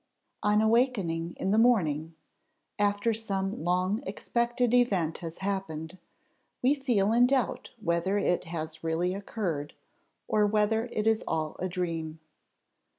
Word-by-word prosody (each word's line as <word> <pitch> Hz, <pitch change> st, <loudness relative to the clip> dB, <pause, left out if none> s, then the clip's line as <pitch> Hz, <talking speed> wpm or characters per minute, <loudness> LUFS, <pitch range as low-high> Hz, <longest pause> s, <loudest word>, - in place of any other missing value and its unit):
On 210 Hz, +1 st, +3 dB
awaking 205 Hz, -8 st, +1 dB
in 190 Hz, -, -1 dB
the 215 Hz, -, +4 dB
morning, 165 Hz, -10 st, +2 dB, 0.6 s
after 205 Hz, +2 st, +2 dB
some 195 Hz, -5 st, -3 dB
long 185 Hz, +5 st, +1 dB
expected 240 Hz, 0 st, 0 dB
event 195 Hz, -10 st, +2 dB
has 165 Hz, -1 st, -7 dB
happened, 185 Hz, -3 st, -3 dB, 0.6 s
we 260 Hz, +3 st, +5 dB
feel 235 Hz, -7 st, +1 dB
in 245 Hz, +1 st, +6 dB
doubt 265 Hz, -1 st, 0 dB
whether 170 Hz, +1 st, 0 dB
it 180 Hz, -3 st, +1 dB
has 160 Hz, -1 st, -5 dB
really 165 Hz, +3 st, 0 dB
occurred, 185 Hz, -7 st, -4 dB, 0.5 s
or 210 Hz, -1 st, +3 dB
whether 215 Hz, +2 st, +2 dB
it 215 Hz, -, -1 dB
is 220 Hz, 0 st, +2 dB
all 155 Hz, -1 st, -1 dB
a 185 Hz, -, -2 dB
dream. 165 Hz, -3 st, -3 dB
195 Hz, 130 wpm, -29 LUFS, 165-225 Hz, 0.6 s, in